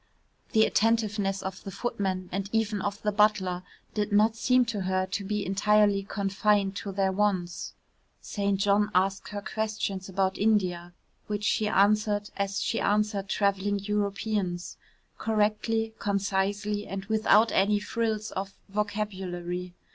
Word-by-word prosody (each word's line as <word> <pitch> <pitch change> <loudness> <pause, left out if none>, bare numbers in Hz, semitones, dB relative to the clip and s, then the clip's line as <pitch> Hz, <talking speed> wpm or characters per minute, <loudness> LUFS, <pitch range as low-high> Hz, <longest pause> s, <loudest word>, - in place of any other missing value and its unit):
The 220 0 +6
attentiveness 210 -3 +1
of 190 0 -6
the - - -6
footman 195 -3 -2
and 195 +1 -3
even 220 -2 0
of 205 0 -3
the 210 - +1
butler 205 -4 +2 0.3
did 210 0 -1
not 215 +2 +4
seem 250 +2 +3
to 220 -4 -3
her 185 0 0
to 200 - -3
be 210 +1 -2
entirely 205 +1 +3
confined 200 0 +1
to 200 - -4
their 190 0 +1
wants. 190 -3 -1 0.4
St. 200 -2 -1
John 205 +1 +3
asked 195 +1 +1
her 205 -1 -5
questions 210 -4 -3
about 190 0 0
India, 185 -5 +1 0.3
which 210 0 -3
she 215 0 +1
answered 205 0 +2
as 200 0 -1
she - - 0
answered 205 -1 0
travelling 200 0 +1
Europeans 200 -2 -2 0.4
correctly, 220 +1 0
concisely, 205 +1 -1
and 195 0 -5
without 220 +1 +4
any 205 +2 +3
frills 220 -1 -2
of 195 0 -5
vocabulary. 185 -4 -3
205 Hz, 135 wpm, -28 LUFS, 195-210 Hz, 0.4 s, The